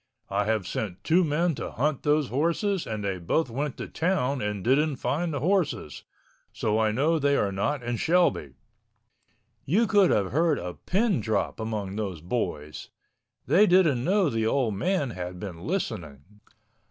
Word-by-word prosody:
I 100 +1 +1
have 110 -3 0
sent 95 -1 -4
two 175 +3 +3
men 165 +2 +1
to - - -5
hunt 145 +2 0
those 150 -2 +1
horses 170 - 0
and 110 -2 -4
they 95 -2 -2
both 120 - 0
went 140 +3 -3
to - - -5
town 160 -6 0
and 105 -2 -3
didn't 140 +4 +2
find 165 +6 -1
the 140 -3 -3
horses. 170 - -1 0.5
So 110 0 0
I 110 -1 +2
know 155 +8 +1
they 140 0 +2
are 100 - +1
not 125 +8 -1
in 120 0 -2
Shelby!" 165 - +1 1.1
You 205 - +2
could 205 -4 +4
have 100 -2 +1
heard 160 +1 +2
a 90 0 -5
pin 200 - 0
drop 110 +1 -1
among 105 -3 -4
those 95 -6 -3
boys. 75 -6 -4 0.6
They 210 +4 +5
didn't 165 -9 +4
know 190 +2 +2
the 115 -1 0
old 120 -3 +1
man 150 - 0
had 90 -2 -6
been 90 -3 -7
listening. 90 - -3
130 Hz, 165 wpm, -26 LUFS, 105-165 Hz, 1.1 s, They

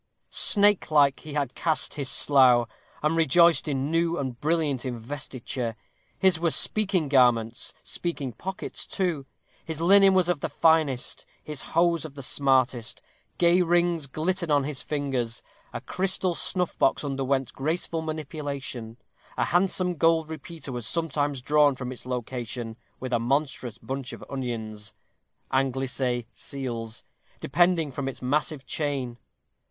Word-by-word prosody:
Snakelike 160 -9 +4
he 150 -2 -8
had 140 -4 -1
cast 160 -2 +1
his 140 -3 -1
slough, 125 -4 +5 0.4
and 155 +2 +2
rejoiced 165 +1 +4
in 140 0 -1
new 165 +1 +1
and 130 -4 -4
brilliant 150 -5 0
investiture. 125 -1 -5 0.4
His 190 -4 +3
were 170 0 +2
"speaking 190 -2 +3
garments, 120 -4 +2
speaking 145 -7 -3
pockets 185 +11 -5
too." 170 -8 -2 0.4
His 160 -2 -5
linen 195 +3 +6
was 185 -2 +3
of 175 -4 0
the - - -3
finest, 155 -6 +1 0.2
his 150 -3 -3 0.2
hose 170 -2 +3
of 150 -3 -9
the 140 - -6
smartest. 130 -3 +1 0.4
Gay 175 +1 +4
rings 170 -3 +1
glittered 170 +5 -2
on 145 -2 +3
his 140 -1 -2
fingers; 135 -6 -2 0.3
a - - -5
crystal 185 -1 0
snuff 180 +1 -1
box 135 - +2
underwent 135 -2 -1
graceful 160 +3 -2
manipulation; 140 -7 -5 0.4
a - - +2
handsome 180 +1 +2
gold 165 0 +2
repeater 160 -1 -7
was 120 -3 -2
sometimes 145 -5 -1
drawn 145 0 +4
from 130 -1 -5
its 125 -1 -9
location 120 -2 -4 0.2
with 130 -1 -5
a 120 - +3
monstrous 130 -2 -1
bunch 135 -1 -5
of 115 - -9
onions 110 -6 -5 0.6
anglicè, 130 -2 0
seals 120 -5 -5 0.4
depending 175 -4 +2
from 135 +1 -4
its 135 - -5
massive 145 +1 -1
chain. 135 -5 -3
140 Hz, 135 wpm, -26 LUFS, 130-165 Hz, 0.6 s, linen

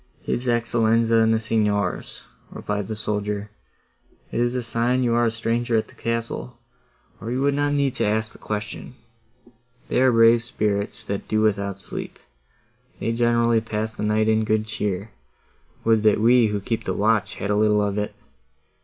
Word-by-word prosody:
"His 125 +1 -2
Excellenza 115 -1 +2
and 110 0 +3
the 110 - +2
Signors," 105 -3 -1 0.3
replied 105 -2 -4
the 110 - -4
soldier: 105 0 -3 0.8
"it - - -2
is 120 +1 +1
a 125 - -1
sign 120 +2 0
you 120 -1 +1
are 120 0 +3
a - - +3
stranger 115 +1 0
at 110 - -2
the - - -17
castle, 115 +1 -4 0.6
or 110 - -6
you 125 +2 -1
would 140 0 +2
not 145 +1 0
need 140 -2 +1
to - - +1
ask 110 +1 0
the - - -16
question. 105 +3 -5 0.9
They - - +2
are 130 -1 +5
brave 115 0 +5
spirits, 105 -3 -2
that 100 0 -4
do 110 0 +1
without 100 -2 0
sleep—they 65 - -9
generally 115 -1 +2
pass 110 0 -3
the - - -8
night 105 +1 +1
in 110 0 +3
good 110 0 +1
cheer; 105 -1 -3 0.7
would 110 -1 +3
that 105 -1 +3
we, 120 +1 +5
who 105 -1 -2
keep 115 +3 -3
the - - -2
watch, 105 -2 +1
had 100 - -3
a - - +2
little 105 0 +3
of 100 0 -1
it! 105 - -4
110 Hz, 175 wpm, -23 LUFS, 105-115 Hz, 0.9 s, are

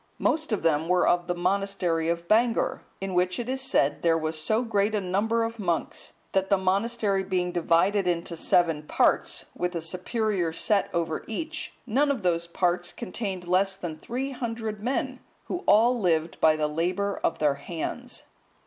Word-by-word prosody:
Most 315 -3 0
of 215 - -1
them 160 -1 +2
were 180 0 +3
of 175 0 +2
the 175 - -1
monastery 180 -3 0
of 170 0 -2
Bangor,(172) 230 +3 +2 0.2
in 195 -1 -3
which, 180 0 +1
it 240 - -4
is 265 +1 -2
said, 150 - +2
there 165 -1 +3
was 155 0 -2
so 220 +8 +1
great 210 -2 +1
a - - +2
number 205 +5 0
of 230 0 -4
monks, 175 -5 -2 0.2
that 190 0 +1
the 200 - +4
monastery 200 +2 +1
being 180 -2 -1
divided 180 +3 +2
into 170 -1 -1
seven 165 -1 +2
parts, 150 - +1
with 180 0 -2
a - - 0
superior 185 +1 -1
set 200 +3 +1
over 165 -2 -2
each, 320 +9 -4
none 270 +5 +2
of 265 -8 -1
those 170 -1 +1
parts 175 0 0
contained 185 -3 -5
less 190 +2 +2
than 175 -5 -5
three 250 - -4
hundred 225 -4 -4
men, 260 +2 -2 0.3
who 355 - -3
all 235 +3 +5
lived 165 -4 0
by 155 -1 +6
the 155 -1 0
labour 180 +6 -1
of - - +1
their 150 -2 +2
hands. 245 +9 -5
185 Hz, 175 wpm, -26 LUFS, 170-225 Hz, 0.3 s, by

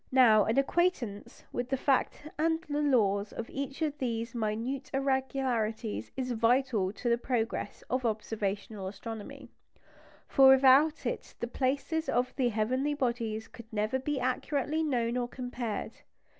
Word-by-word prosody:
Now, 230 -5 +6
an 225 - 0
acquaintance 275 - 0
with 245 0 -2
the 270 - +1
fact 275 +2 0
and 320 +1 +1
the 295 0 -1
laws 210 -8 +2
of 230 - -6
each 275 +3 -4
of 295 -2 -2
these 230 -2 -2
minute 235 +4 -2
irregularities 260 -5 -1
is 255 -1 -2
vital 230 -4 +2
to 230 - -5
the 235 0 +3
progress 235 -2 -2
of 255 0 -1
observational 210 -2 -2
astronomy; 210 +2 -8 0.8
for 270 -2 +6
without 270 +4 +6
it - - -4
the - - -1
places 275 +6 -1
of 245 +1 0
the 255 -3 +2
heavenly 255 +7 0
bodies 235 -5 -2
could 235 -2 -13
never 215 +4 0
be 285 +1 -2
accurately 280 +4 -1
known 245 -6 0
or 245 -1 -1
compared. 245 -3 -4
250 Hz, 145 wpm, -30 LUFS, 225-270 Hz, 0.8 s, Now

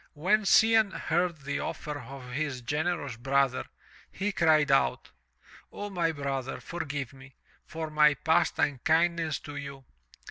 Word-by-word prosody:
When 190 +8 +1
Cianne 220 0 +5
heard 170 -1 -1
the 140 +1 -3
offer 150 -1 -5
of 130 -1 -10
his 140 -1 -3
generous 145 -1 -2
brother, 135 +1 +1 0.5
he 205 +2 -2
cried 155 -5 +3
out: 135 - +1 0.6
"O, 205 0 -6
my 170 -3 +1
brother, 135 -3 -4
forgive 145 -7 -5
me, 135 0 -15 0.3
for 160 -1 -5
my 150 -1 +5
past 165 +3 +1
unkindness 160 +3 +1
to 145 - -9
you. 140 -2 -8
150 Hz, 135 wpm, -28 LUFS, 140-170 Hz, 0.6 s, Cianne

